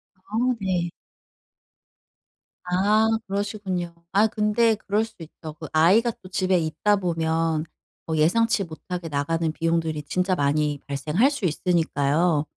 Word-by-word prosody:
아 200 +3 -7 0.2
네. 180 -3 -1 1.8
아 205 +5 +3 0.2
그러시군요. 195 -3 -3 0.2
아 205 +3 +5
근데 220 +1 +2
그럴 210 0 0
수 225 -1 -9
있죠. 160 -1 -9
그 160 - -6
아이가 195 +10 +4
또 185 - -12
집에 185 0 +1
있다 170 +5 +1
보면 165 -3 0 0.4
뭐 160 - -2
예상치 210 +7 +3
못하게 175 0 -6
나가는 160 +3 -1
비용들이 160 -1 -1
진짜 180 +5 0
많이 145 0 +1
발생할 150 - +2
수 280 -6 -6
있으니까요. 160 -2 +1
175 Hz, 255 characters per minute, -24 LUFS, 160-205 Hz, 1.8 s, 아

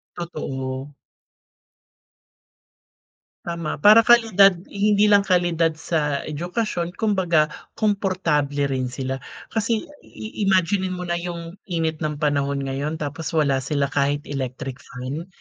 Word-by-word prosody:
Totoo. 135 -5 -5 2.5
Tama. 170 -2 -3
Para 215 +9 +6
kalidad. 215 -5 +6 0.2
Hindi 210 +1 +3
lang 200 - +7
kalidad 170 -3 +2
sa 150 -3 -1
edukasyon 175 +3 -3
kumbaga, 180 -8 +2 0.2
komportable 170 -9 0
rin 130 -1 -1
sila. 130 +1 -4 0.3
Kasi 225 0 0 0.2
i 220 +1 -10
imaginin 185 0 +2
mo 180 - -5
na 175 -1 -2
yung 170 +1 -6
init 160 -3 -1
ng 155 -2 -2
panahon 140 -2 0
ngayon 140 +3 -3
tapos 155 +2 -5
wala 140 -4 +2
sila 140 +1 -1
kahit 145 +1 +1
electric 135 -1 -5
fan? 135 +7 -7
160 Hz, 115 wpm, -23 LUFS, 140-185 Hz, 2.5 s, lang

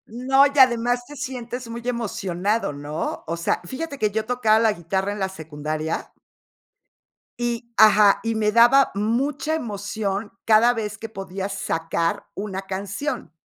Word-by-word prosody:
No, 270 +3 +4
y 285 0 -1
además 245 -1 +4
te 295 - -10
sientes 250 -3 -5
muy 235 +1 -6
emocionado 205 -4 -1
¿no? 145 +2 -4
O 165 - -2
sea, 170 - 0
fíjate 280 - -5
que 215 -4 +1
yo 220 +1 -1
tocaba 225 -2 +3
la 225 -1 +4
guitarra 190 +3 -2
en 205 - -5
la 190 -1 -1
secundaria. 155 -2 -4 1.3
Y 235 0 -3
ajá, 210 -1 +6
y 225 0 0
me 215 -1 +1
daba 240 +4 +6
mucha 270 +9 0
emoción 205 -5 -3
cada 225 +2 +5
vez 215 -2 -4
que 225 - -6
podía 195 -2 -5
sacar 165 -1 -2
una 195 -1 -5
canción. 195 - -4
215 Hz, 145 wpm, -23 LUFS, 195-245 Hz, 1.3 s, ajá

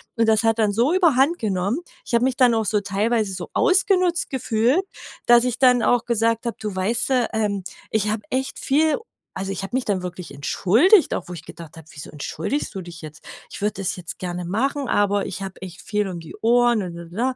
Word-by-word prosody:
und 230 -1 +2
das 220 0 +3
hat 225 0 +2
dann 215 -2 +2
so 235 - +2
überhand 330 -3 +3
genommen. 200 - -1 0.3
Ich - - -8
habe 235 0 +3
mich 255 -1 0
dann 250 -3 +5
auch 225 -1 0
so 210 +1 +1
teilweise 205 +1 0
so 180 -2 -6
ausgenutzt 365 -2 +2
gefühlt, 255 - +1 0.4
dass 240 0 +6
ich 250 -2 -2
dann 250 -3 +5
auch 245 0 +2
gesagt 230 0 0
habe: 235 - -2
„Du 210 -2 -4
weißt 210 +8 0
du, 250 -3 +2
ähm, 205 -3 -1 0.3
ich 210 -1 +1
habe 215 0 -1
echt 265 +1 -2
viel 305 +3 +2
u“ - - -12 0.3
also 195 +1 -3
ich 195 - -5
habe 195 - -5
mich 260 - 0
dann 190 -3 -1
wirklich 180 -3 -7
entschuldigt, 225 - +3
auch - - -4
wo - - -6
ich 165 -3 -9
gedacht 165 -1 -11
habe: 160 -1 -13
„Wieso 145 - -9
entschuldigst 160 - -4
du 190 - -4
dich 170 -1 -10
jetzt?“ 155 0 -11 0.3
Ich - - -8
würde 210 0 0
das 190 - -1
jetzt 175 -2 -8
gerne 180 -1 -4
machen, 265 +9 -1
aber 205 0 +1
ich - - -6
habe 190 -2 -8
echt 185 0 -9
viel 210 -1 -1
um 175 -2 -6
die 165 -1 -11
Ohren. 225 -2 +1
220 Hz, 220 wpm, -22 LUFS, 185-250 Hz, 0.4 s, dass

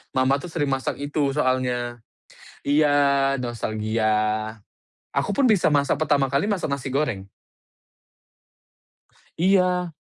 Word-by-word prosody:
mama 130 +2 +3
tuh 180 - -8
sering 150 -5 -2
masak 135 -1 -1
itu 145 -1 -1
soalnya. 125 -3 -1 0.7
Iya, 145 +1 +3 0.5
nostalgia. 110 -2 -2 1.0
Aku 200 - -1
pun 255 -1 +3
bisa 200 -5 +3
masak 140 0 +2
pertama 140 -4 +1
kali 140 +8 +1
masak 195 -8 -1
nasi 140 -1 -3
goreng. 110 -10 -1 2.1
Iya. 180 -1 +2
140 Hz, 105 wpm, -23 LUFS, 125-160 Hz, 2.1 s, mama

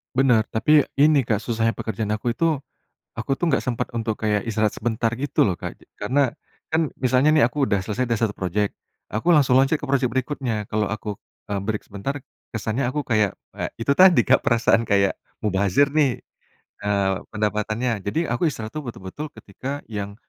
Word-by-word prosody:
Benar, 125 -4 +4
tapi 150 +6 +4 0.2
ini 145 -2 +5
Kak 110 -3 0
susahnya 115 -1 0
pekerjaan 110 -1 -3
aku 115 +3 -1
itu, 165 -4 +1 0.5
aku 135 +5 -2
tuh 175 - -2
nggak 160 -5 +2
sempet 120 -2 -3
untuk 115 -2 -2
kayak 105 -1 0
istirahat 110 -1 +1
sebentar, 115 0 -1
gitu 145 0 +2
loh, 95 - +2
Kak. - - -6 0.2
Karena 135 -1 +2 0.4
kan 160 -1 +2
misalnya 130 +3 +3
nih 150 - +6
aku 135 +3 0
udah 100 - +2
selesai 115 +4 -2
dari 115 - +1
1 105 - -1
projek, 100 +2 -1 0.4
aku 110 +11 -2
langsung 130 -3 +5
loncat 135 +4 +3
ke 145 - -8
projek 135 -2 +1
berikutnya. 130 -3 -2
Kalau 105 -1 +1
aku, 105 -1 -5 0.3
eee, 100 - 0
break 105 +1 -3
sebentar, 105 +8 -4 0.3
kesannya 115 +3 -2
aku 145 +2 -2
kayak 110 -5 +1 0.2
eee, - - -3 0.2
itu 140 - +3
tadi 180 +3 +7
Kak, - - +4
perasaan 115 -2 +2
kayak 100 -1 +3 0.3
mubazir 100 +8 +2
nih, 145 -5 +1 0.6
eee, 100 -1 +2 0.2
pendapatannya. 105 +2 -1
Jadi, 100 - -2
aku 120 +8 +1
istirahat 110 -7 -4
tuh 155 - -4
betul-betul 120 +7 -6
ketika 135 +8 -6
yang 100 -1 -4
115 Hz, 180 wpm, -23 LUFS, 105-135 Hz, 0.6 s, tadi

